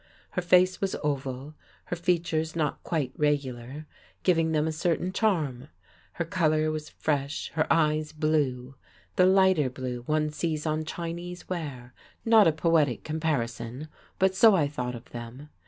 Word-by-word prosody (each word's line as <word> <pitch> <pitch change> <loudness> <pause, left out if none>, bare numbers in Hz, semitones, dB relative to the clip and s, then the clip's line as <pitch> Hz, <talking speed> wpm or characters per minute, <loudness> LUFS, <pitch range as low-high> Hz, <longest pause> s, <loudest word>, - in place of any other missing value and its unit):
Her 180 - -1
face 180 +1 +4
was 195 -1 0
oval, 140 0 -3 0.3
her - - -3
features 170 -2 0
not 155 -3 -1
quite 145 -7 -2
regular, 140 -1 -1 0.4
giving 165 -3 +3
them 155 -1 +2
a - - 0
certain 175 +3 -1
charm; 155 - 0 0.5
her 170 - -2
colour 155 -3 +1
was 155 -1 -5
fresh, 145 -2 -2
her 155 - 0
eyes 155 -1 +2
blue, 145 -5 0 0.4
the 180 - +5
lighter 190 -7 +4
blue 125 -1 -5
one 155 0 +1
sees 155 0 -2
on 155 0 -1
Chinese 175 +2 -6
ware: 140 -9 -5 0.3
not 225 -4 +6
a - - +5
poetic 155 -4 +1
comparison, 145 -4 -3 0.3
but 190 0 +3
so 210 +2 +6
I 155 -6 +2
thought 125 -4 -4
of 120 +1 -11
them. 120 +5 -8
155 Hz, 150 wpm, -27 LUFS, 140-170 Hz, 0.5 s, not